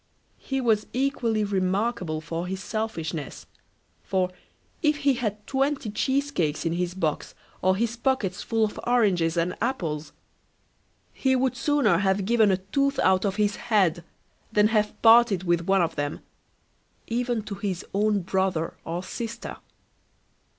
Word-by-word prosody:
He 270 -1 -3
was 220 -4 +2
equally 245 -5 0
remarkable 190 -3 -1
for 165 +2 -4
his 190 +1 -4
selfishness; 170 - -4 0.6
for 185 -1 0 0.5
if 300 -2 +3
he 280 - +5
had 215 -4 -3
twenty 270 -4 -1
cheesecakes 265 - 0
in 165 - +1
his 175 +1 -2
box, 160 -5 -2 0.3
or 185 0 +3
his 230 +3 -1
pockets 235 -7 0
full 225 -1 +1
of 210 - -6
oranges 185 -9 +2
and 170 +2 +1
apples, 165 - -2 1.0
he 265 -1 +1
would 255 0 +1
sooner 245 - +2
have 190 0 +1
given 225 -1 +4
a 190 - +3
tooth 275 +9 0
out 190 +1 +3
of 195 -1 0
his 210 -1 +1
head 190 -7 +1 0.5
than 210 0 +4
have 210 -2 0
parted 225 -5 +6
with 175 -1 0
one 195 -2 +4
of 165 0 -2
them, 145 0 -3 0.8
even 240 -1 -1
to 205 - -6
his 195 -3 -4
own 205 0 +2
brother 190 -3 0
or 170 +2 -4
sister. 230 +4 -6
205 Hz, 145 wpm, -26 LUFS, 180-235 Hz, 1.0 s, parted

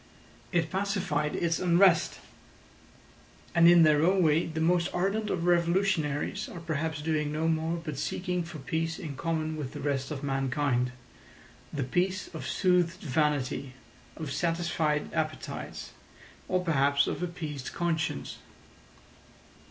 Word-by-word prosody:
It 165 -3 +1
pacified 185 -7 -1
its 165 -1 0
unrest; 175 -1 +4 1.3
and 170 0 +6
in 175 -1 +8
their 155 -1 +5
own 185 +2 +4
way 160 +1 +3
the 160 0 -4
most 170 +2 +2
ardent 200 +4 0
of 170 -3 -1
revolutionaries 170 -4 +1
are 175 - -8
perhaps 160 -2 -3
doing 150 -2 0
no 155 +2 0
more 160 +1 0
but 150 -4 -5
seeking 180 -1 -2
for 165 -1 -7
peace 160 +3 -2
in 155 -6 -6
common 160 +1 -2
with 140 -4 -5
the - - -6
rest 135 -2 -1
of 145 -2 -5
mankind—the 135 0 -3
peace 185 +9 -1
of - - -6
soothed 180 -1 +2
vanity, 140 -3 0 0.4
of 155 -3 -5
satisfied 165 -3 0
appetites, - - -4 0.6
or 185 0 +1
perhaps 140 -3 +3
of - - -3
appeased 155 -6 -5
conscience. 165 -2 -2
160 Hz, 130 wpm, -29 LUFS, 150-175 Hz, 1.3 s, in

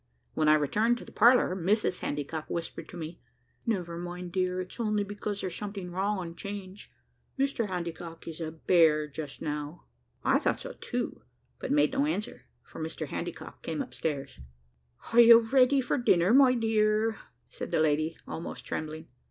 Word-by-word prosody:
When 155 - +1
I 155 - +7
returned 215 - +2
to - - -10
the - - -13
parlour, 240 -6 +5
Mrs 195 +4 +1
Handycock 150 +2 -4
whispered 170 -1 -5
to 175 - -9
me, 165 +1 -7 0.5
"Never 175 -6 -1
mind, 175 +1 -6
my 175 - -8
dear, 185 0 0
it's 185 +6 -9
only 210 -2 +1
because 205 0 -4
there's 185 -2 -3
something 200 -2 -6
wrong 200 +3 0
on 170 -2 -6
'Change. 200 +1 -8 0.5
Mr 270 -5 0
Handycock 170 -2 -6
is 165 0 -7
a 160 -1 -3
bear 160 -2 +3
just 150 -1 -7
now." 150 +2 -4 0.4
I - - +4
thought - - 0
so - - -7
too, - - -3 0.4
but - - -4
made 290 +1 +4
no 280 +2 +2
answer, 215 -9 -3 0.2
for - - -10
Mr - - -4
Handycock - - -6
came - - -4
upstairs. 145 - -4 0.7
"Are 235 - +6
you 235 -1 +10
ready 260 +3 +4
for 255 - 0
your 245 - -3
dinner, 180 0 +4
my 260 -1 +7
dear?" 220 -1 +2 0.3
said - - -6
the - - +1
lady, 155 +1 +1
almost 165 - -6
trembling. 155 +1 -5
185 Hz, 175 wpm, -29 LUFS, 165-225 Hz, 0.7 s, you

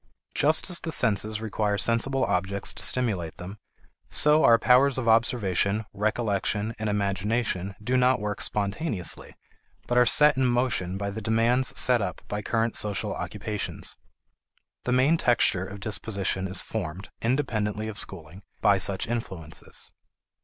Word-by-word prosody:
Just 155 +3 +2
as 175 - +4
the 165 - -5
senses 110 -4 +1
require 105 -2 -1
sensible 120 +6 +1
objects 100 +1 -1
to - - -7
stimulate 100 -11 0
them, 95 +4 -9 0.5
so 150 +1 +4
our 115 - +7
powers 130 +3 +4
of 125 -3 -3
observation, 110 -2 +2
recollection, 105 0 -1
and 110 0 -2
imagination 100 -1 -1
do 125 +4 0
not 125 +1 +3
work 105 0 -4
spontaneously, 100 - -2 0.5
but 125 0 +2
are 125 - +5
set 150 +4 +6
in 130 -1 +2
motion 120 -7 0
by 100 0 -3
the 110 +2 -6
demands 115 +4 +1
set 125 -2 +4
up 90 -3 -4
by 105 0 -3
current 115 +1 -1
social 105 -2 -1
occupations. 105 -2 -4 0.9
The 125 - -1
main 130 +6 +3
texture 95 - +2
of 100 +1 -9
disposition 100 -2 -2
is 95 0 -1
formed, 95 -2 -6
independently 110 -4 -1
of 110 -1 -5
schooling, 90 0 -7 0.2
by 100 -1 +3
such 95 0 +1
influences. 95 -9 -3
110 Hz, 145 wpm, -26 LUFS, 100-120 Hz, 0.9 s, our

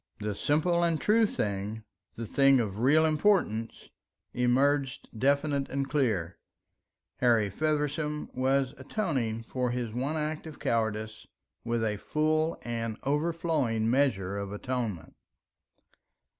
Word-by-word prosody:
The 105 0 -2
simple 160 - +1
and 165 -2 +1
true 220 +1 +4
thing 105 - -3 0.3
the 115 - -5
thing 135 +4 +4
of 105 -3 -2
real 150 +6 +4
importance 155 - +1 0.4
emerged 135 +2 +1
definite 140 +3 +1
and 140 0 -2
clear: 110 - 0 0.8
Harry 115 -5 +3
Feversham 150 +3 -1
was 135 +1 +1
atoning 130 - -2
for 125 +1 -2
his 120 -2 -3
one 135 +6 -2
act 155 +1 -3
of 155 - -9
cowardice 110 -1 -2 0.4
with 115 -1 -1
a 105 -2 0
full 155 +6 0
and 115 -2 -3
an - - -25
overflowing 145 -7 0
measure 100 -8 +1
of 100 -1 -5
atonement. 110 - -4
130 Hz, 120 wpm, -29 LUFS, 110-150 Hz, 0.8 s, true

